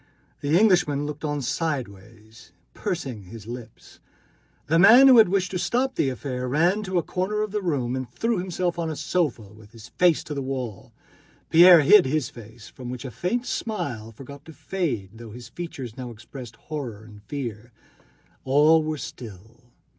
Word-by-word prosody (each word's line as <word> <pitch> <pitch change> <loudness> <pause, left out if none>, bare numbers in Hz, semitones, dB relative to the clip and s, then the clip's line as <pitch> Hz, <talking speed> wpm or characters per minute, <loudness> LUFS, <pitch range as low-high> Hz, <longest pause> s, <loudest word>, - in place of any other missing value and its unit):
The 145 +3 +2
Englishman 175 -9 +3
looked 150 +1 -7
on 145 -2 -2
sideways, 110 - -5 0.2
pursing 135 - -5
up - - -14
his 115 -3 -10
lips. 115 -1 -10 0.7
The 165 +3 +2
man 235 +8 +8
who 255 -3 +8
had 215 - +6
wished 190 -1 0
to 180 - -2
stop 255 +7 0
the 135 - 0
affair 125 -1 -4
ran 170 +9 +2
to 185 -1 -2
a 170 - +1
corner 210 +4 -2
of 215 - -4
the 210 0 -2
room 135 -9 -1
and 130 -1 -5
threw 230 -3 -1
himself 180 -1 -2
on 165 -1 -2
a 155 - -4
sofa 150 - -2
with 110 0 -17
his 110 -2 -13
face 175 -3 +2
to 150 - -6
the 140 - -3
wall. 130 -6 -5 0.6
Pierre 175 0 +8
hid 180 +4 +6
his 145 -1 -1
face, 115 -1 -13
from 125 -2 -10
which 125 +2 -6
a 130 - -6
faint 235 - -2
smile 125 - -4
forgot 140 +5 -12
to 160 - -12
fade 150 - -3
though 115 -1 -11
his 120 0 -10
features 135 -9 -7
now 130 -2 -7
expressed 120 +1 -11
horror 125 -8 -7
and 105 -2 -14
fear. 120 -2 -6 0.7
All 150 +4 +4
were 155 0 -3
still. 110 -3 -10
140 Hz, 180 wpm, -24 LUFS, 115-175 Hz, 0.7 s, man